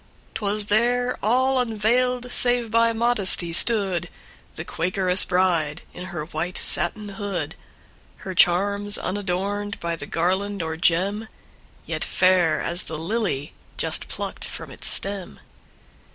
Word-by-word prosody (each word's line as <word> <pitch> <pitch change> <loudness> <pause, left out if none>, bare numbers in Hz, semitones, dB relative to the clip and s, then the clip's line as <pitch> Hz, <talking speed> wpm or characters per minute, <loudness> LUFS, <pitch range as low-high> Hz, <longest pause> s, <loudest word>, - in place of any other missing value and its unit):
'T 225 - -6
was 205 +1 -1
there, 245 +4 +1
all 260 +4 +2
unveiled, 245 +2 +1
save 245 -3 +1
by 230 0 +4
modesty, 220 -7 +2
stoodThe 195 -3 +3 0.6
Quakeress 185 +2 +3
bride, 175 -4 +1
in 180 - -8
her 175 -5 -5
white 175 +2 -4
satin 210 +4 0
hood:Her 195 -1 -8
charms 200 +4 +2
unadorned 200 +1 -3
by 170 0 -2
the 145 -3 -8
garland 190 +3 -1
or 160 0 -3
gem, 190 +6 +1 0.6
Yet - - -2
fair 180 -4 +3
as 175 +1 -2
the 160 - -5
lily 170 -5 -2 0.2
just - - -1
plucked - - -6
from - - -7
its - - -6
stem. 195 -2 0
200 Hz, 125 wpm, -23 LUFS, 175-220 Hz, 0.6 s, by